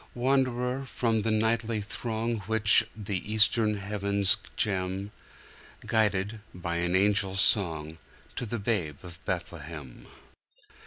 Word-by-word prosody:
Wanderer 130 Hz, 0 st, +1 dB
from 115 Hz, -4 st, 0 dB
the 115 Hz, -, -1 dB
nightly 110 Hz, +1 st, +1 dB
throng 115 Hz, +2 st, -3 dB
Which 110 Hz, 0 st, +4 dB
the 100 Hz, -3 st, -2 dB
eastern 110 Hz, 0 st, +3 dB
heavens 100 Hz, 0 st, +1 dB, 0.2 s
gem; 95 Hz, -1 st, -1 dB, 0.7 s
Guided, 105 Hz, -1 st, +1 dB, 0.2 s
by 85 Hz, -1 st, -3 dB
an 85 Hz, +1 st, 0 dB
angel's 100 Hz, 0 st, +3 dB
song, 80 Hz, -6 st, +3 dB, 0.4 s
To 120 Hz, -, -3 dB
the 120 Hz, -, -3 dB
Babe 100 Hz, -9 st, -1 dB
of 85 Hz, -2 st, -11 dB
Bethlehem. 75 Hz, -4 st, -6 dB
105 Hz, 110 wpm, -28 LUFS, 95-115 Hz, 0.7 s, Which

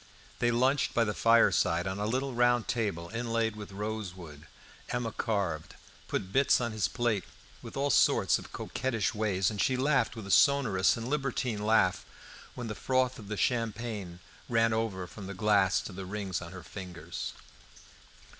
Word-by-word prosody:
They 120 Hz, -, +3 dB
lunched 130 Hz, +4 st, +2 dB
by 115 Hz, -, +4 dB
the 105 Hz, -2 st, -1 dB
fireside 100 Hz, -7 st, +3 dB
on 95 Hz, +1 st, -3 dB
a 105 Hz, -, -1 dB
little 130 Hz, +3 st, -1 dB
round 120 Hz, -1 st, +3 dB
table, 100 Hz, -8 st, -2 dB
inlaid 115 Hz, -1 st, -1 dB
with 105 Hz, -1 st, -8 dB
rosewood. 95 Hz, -7 st, -6 dB, 0.4 s
Emma 120 Hz, -2 st, -2 dB
carved, 95 Hz, -9 st, -2 dB, 0.3 s
put 95 Hz, -, -3 dB
bits 135 Hz, 0 st, +4 dB
on 120 Hz, -2 st, -1 dB
his 105 Hz, -5 st, 0 dB
plate 110 Hz, 0 st, 0 dB, 0.4 s
with -, -, -9 dB
all 140 Hz, +1 st, +1 dB
sorts -, -, +4 dB
of -, -, -12 dB
coquettish 120 Hz, -6 st, -2 dB
ways, 100 Hz, -4 st, +1 dB
and 105 Hz, -, -2 dB
she 130 Hz, -, +2 dB
laughed 135 Hz, -4 st, +2 dB
with 110 Hz, -3 st, -7 dB
a 100 Hz, -, -4 dB
sonorous 125 Hz, -11 st, +4 dB
and 115 Hz, +1 st, -5 dB
libertine 130 Hz, -6 st, -1 dB
laugh 105 Hz, -4 st, +3 dB, 0.5 s
when 120 Hz, -, -5 dB
the 110 Hz, -, -4 dB
froth 130 Hz, +2 st, 0 dB
of 105 Hz, -, -10 dB
the 105 Hz, 0 st, -4 dB
champagne 110 Hz, -6 st, -2 dB, 0.3 s
ran 115 Hz, -1 st, +3 dB
over 110 Hz, -5 st, -1 dB
from 95 Hz, +2 st, -9 dB
the 100 Hz, -, -6 dB
glass 100 Hz, -1 st, +3 dB
to 100 Hz, -, -8 dB
the 95 Hz, 0 st, -7 dB
rings 95 Hz, -3 st, -3 dB
on 85 Hz, -1 st, -8 dB
her 95 Hz, -1 st, -9 dB
fingers. 90 Hz, -3 st, -7 dB
110 Hz, 170 wpm, -30 LUFS, 95-120 Hz, 0.5 s, by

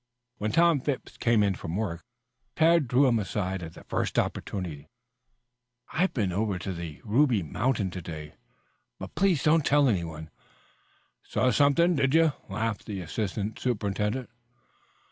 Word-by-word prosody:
When 105 Hz, +1 st, -1 dB
Tom 170 Hz, 0 st, +4 dB
Phipps 135 Hz, 0 st, -4 dB
came 115 Hz, -3 st, +3 dB
in 100 Hz, -1 st, +2 dB
from 85 Hz, -2 st, -5 dB
work, 95 Hz, -5 st, -3 dB, 0.5 s
Tad 165 Hz, -3 st, +4 dB
drew 125 Hz, +4 st, +4 dB
him 120 Hz, -3 st, +3 dB
aside 95 Hz, -2 st, -2 dB
at 85 Hz, -1 st, -8 dB
the -, -, -12 dB
first -, -, -2 dB
opportunity. 80 Hz, -7 st, -3 dB, 1.0 s
"I've 185 Hz, +4 st, +2 dB
been 100 Hz, -7 st, -1 dB
over 100 Hz, +1 st, -1 dB
to 95 Hz, +1 st, -4 dB
the 85 Hz, -3 st, -7 dB
Ruby 115 Hz, -2 st, +2 dB
Mountain 105 Hz, -, -1 dB
to 90 Hz, -, -6 dB
day, 75 Hz, -3 st, -8 dB, 0.6 s
but -, -, -8 dB
please 185 Hz, -7 st, +2 dB
don't 155 Hz, 0 st, +4 dB
tell 145 Hz, 0 st, +4 dB
anyone." 80 Hz, -7 st, -2 dB, 0.9 s
"Saw 130 Hz, -, +1 dB
something, 145 Hz, +8 st, +4 dB
did 135 Hz, +1 st, +2 dB
you?" 165 Hz, -3 st, +5 dB, 0.2 s
laughed 105 Hz, +1 st, -3 dB
the 100 Hz, -2 st, -4 dB
assistant 105 Hz, +4 st, -3 dB
superintendent. 105 Hz, +1 st, -1 dB
110 Hz, 145 wpm, -27 LUFS, 95-140 Hz, 1.0 s, you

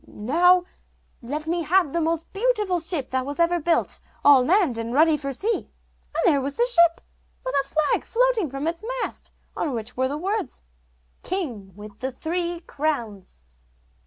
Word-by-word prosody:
'Now 350 Hz, +11 st, +3 dB, 0.6 s
let 290 Hz, +6 st, -4 dB
me 340 Hz, +2 st, -1 dB
have 340 Hz, -2 st, +2 dB
the 340 Hz, -, +1 dB
most 325 Hz, 0 st, -2 dB
beautiful 420 Hz, -4 st, +1 dB
ship 325 Hz, -5 st, -2 dB
that 260 Hz, -, +1 dB
ever 335 Hz, +6 st, +1 dB
was 330 Hz, -, -7 dB
built, 335 Hz, 0 st, +1 dB, 0.3 s
all 280 Hz, -3 st, +7 dB
manned 330 Hz, -, +2 dB
and 230 Hz, +2 st, -4 dB
ready 315 Hz, +1 st, +5 dB
for 275 Hz, -2 st, -4 dB
sea.' 420 Hz, -, -1 dB, 0.5 s
And -, -, 0 dB
there 295 Hz, -7 st, +4 dB
was 275 Hz, +1 st, -3 dB
the 475 Hz, -, +3 dB
ship, 340 Hz, -8 st, +4 dB, 0.4 s
with -, -, -2 dB
a -, -, -15 dB
flag 310 Hz, -1 st, +1 dB
floating 470 Hz, -, +1 dB
from 275 Hz, +2 st, -5 dB
its 335 Hz, +4 st, -3 dB, 0.2 s
mast -, -, -5 dB, 0.2 s
on 285 Hz, -6 st, -2 dB
which 230 Hz, +2 st, -5 dB
were 260 Hz, +1 st, +1 dB
the 285 Hz, +3 st, -3 dB
words, 390 Hz, -, -3 dB, 0.6 s
'King 240 Hz, -, -4 dB
with 205 Hz, 0 st, -12 dB
the 260 Hz, +1 st, -3 dB
three 340 Hz, +5 st, -2 dB
crowns. 230 Hz, -, -4 dB
315 Hz, 170 wpm, -24 LUFS, 260-355 Hz, 0.6 s, all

